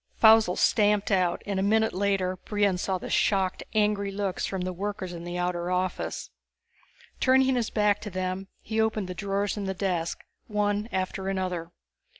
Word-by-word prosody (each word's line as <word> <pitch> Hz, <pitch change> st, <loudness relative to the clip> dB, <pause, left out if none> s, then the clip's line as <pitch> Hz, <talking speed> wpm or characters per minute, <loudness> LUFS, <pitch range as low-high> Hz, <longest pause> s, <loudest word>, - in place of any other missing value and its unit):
Faussel 220 Hz, -4 st, +6 dB
stamped 210 Hz, -1 st, +3 dB
out, 180 Hz, -3 st, +1 dB
and 200 Hz, -2 st, -1 dB
a -, -, +1 dB
minute 220 Hz, +3 st, +2 dB
later 190 Hz, -1 st, 0 dB
Brion 205 Hz, -2 st, 0 dB
saw 190 Hz, 0 st, -1 dB
the -, -, -7 dB
shocked, 190 Hz, -2 st, +1 dB
angry 210 Hz, -1 st, +2 dB
looks 195 Hz, -2 st, -2 dB
from 190 Hz, -2 st, -3 dB
the 185 Hz, 0 st, -2 dB
workers 190 Hz, -1 st, -4 dB
in 170 Hz, 0 st, -7 dB
the 175 Hz, 0 st, -4 dB
outer 180 Hz, 0 st, -1 dB
office. 185 Hz, 0 st, -2 dB, 0.9 s
Turning 265 Hz, 0 st, +4 dB
his 235 Hz, -3 st, 0 dB
back 210 Hz, -1 st, +2 dB
to 210 Hz, -, -5 dB
them, 185 Hz, 0 st, -3 dB, 0.2 s
he 220 Hz, 0 st, 0 dB
opened 220 Hz, -3 st, 0 dB
the 180 Hz, -, -4 dB
drawers 200 Hz, +3 st, -1 dB
in 205 Hz, -, -3 dB
the 190 Hz, 0 st, -2 dB
desk, 180 Hz, -3 st, -2 dB, 0.3 s
one 210 Hz, 0 st, 0 dB
after 190 Hz, +1 st, -2 dB
another. 180 Hz, -3 st, -2 dB
195 Hz, 170 wpm, -27 LUFS, 185-210 Hz, 0.9 s, Faussel